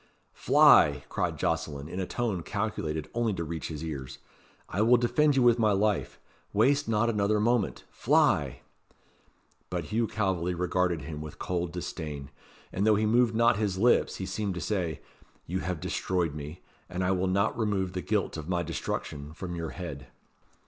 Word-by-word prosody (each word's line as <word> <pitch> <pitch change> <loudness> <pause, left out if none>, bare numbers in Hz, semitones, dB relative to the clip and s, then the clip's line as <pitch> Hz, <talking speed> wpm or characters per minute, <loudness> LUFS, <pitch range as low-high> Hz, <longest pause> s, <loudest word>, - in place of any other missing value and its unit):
"Fly!" - - +5
cried - - -1
Jocelyn, 75 -3 -2
in 90 +3 -5
a 95 - -2
tone 110 -7 -2
calculated 80 -6 -3
only 115 -2 0
to 85 - -3
reach 80 0 -4
his 80 -1 -6
ears. 70 -5 -6 0.5
"I 100 - -2
will 120 +3 +6
defend 145 +5 +2
you 130 - +4
with 120 -1 +5
my 110 -2 +3
life. 105 0 0 0.3
Waste 135 +6 +3
not 110 +1 +2
another 105 -1 +1
moment 115 -1 +1
fly!" - - +2 1.1
But - - -2
Hugh 115 +1 +2
Calveley 95 -5 -1
regarded 90 -2 0
him 75 +1 -6
with 75 -1 -8
cold 90 -1 -2
disdain, 75 -5 -6 0.4
and 95 - -1
though 110 - +6
he 110 +1 +1
moved 115 +1 +3
not 115 0 +4
his 105 -3 -1
lips, 120 +5 +3
he 95 - -4
seemed 95 0 -3
to - - -3
say, 85 -3 -2 0.4
"You 90 +3 -2
have 90 -3 -3
destroyed 85 -1 -1
me; 75 +3 -8 0.3
and 90 0 -2
I 90 - +2
will 95 0 +1
not 100 +3 +1
remove 100 -5 -1
the 90 - -3
guilt 105 -4 -1
of 80 +1 -7
my 90 -1 0
destruction 75 -2 -4
from 85 +1 -6
your 85 -1 -4
head." 70 -7 -7
95 Hz, 175 wpm, -28 LUFS, 80-110 Hz, 1.1 s, will